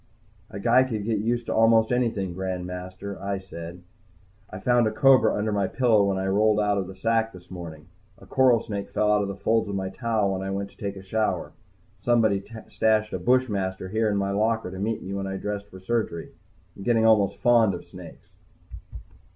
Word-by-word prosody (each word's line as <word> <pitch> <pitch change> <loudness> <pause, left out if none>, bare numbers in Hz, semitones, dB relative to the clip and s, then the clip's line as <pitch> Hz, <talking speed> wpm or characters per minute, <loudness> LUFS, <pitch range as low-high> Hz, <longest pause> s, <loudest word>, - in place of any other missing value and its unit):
"A 100 - -7
guy 120 +5 +4
could 110 -6 -4
get 110 -2 0
used 120 +2 -1
to - - -2
almost 115 0 +4
anything, 115 -7 0
Grand 95 -1 -4
Master," 95 +2 -7
I 100 0 -2
said. 90 -2 -9 0.7
"I 95 - -7
found 120 +3 +2
a - - 0
cobra 135 +1 +4
under 105 +1 -1
my 100 -2 0
pillow 110 -5 +3
when 100 -1 0
I 95 - -2
rolled 105 +2 +3
out 105 -1 +1
of 95 - -3
the 95 - -9
sack 115 +3 0
this 90 0 -14
morning. 80 -4 -8 0.3
A - - -16
coral 130 -3 +4
snake 100 -3 -5
fell 105 0 +1
out 105 0 +3
of 100 - -2
the 100 - -5
folds 110 +2 0
of 100 - -3
my 95 -1 -2
towel 110 -2 0
when 95 - -3
I 95 - -4
went 100 +1 -4
to - - -25
take 100 -1 -4
a 95 - -10
shower. 110 +3 -1 0.5
Somebody 110 -5 +2 0.2
stashed 110 -1 +1
a - - -2
bushmaster 100 -7 0
here 110 +2 +1
in 100 - 0
my 100 0 -1
locker 110 -1 0
to 95 - -7
meet 110 +3 -2
me 95 - -6
when 100 0 -3
I 95 0 -4
dressed 100 0 -4
for 95 -2 -12
surgery. 95 -4 -2 0.4
I'm - - -11
getting 115 +2 +2
almost 100 -3 +4
fond 115 -2 +4
of - - -9
snakes." - - -13
100 Hz, 210 wpm, -25 LUFS, 95-115 Hz, 0.7 s, guy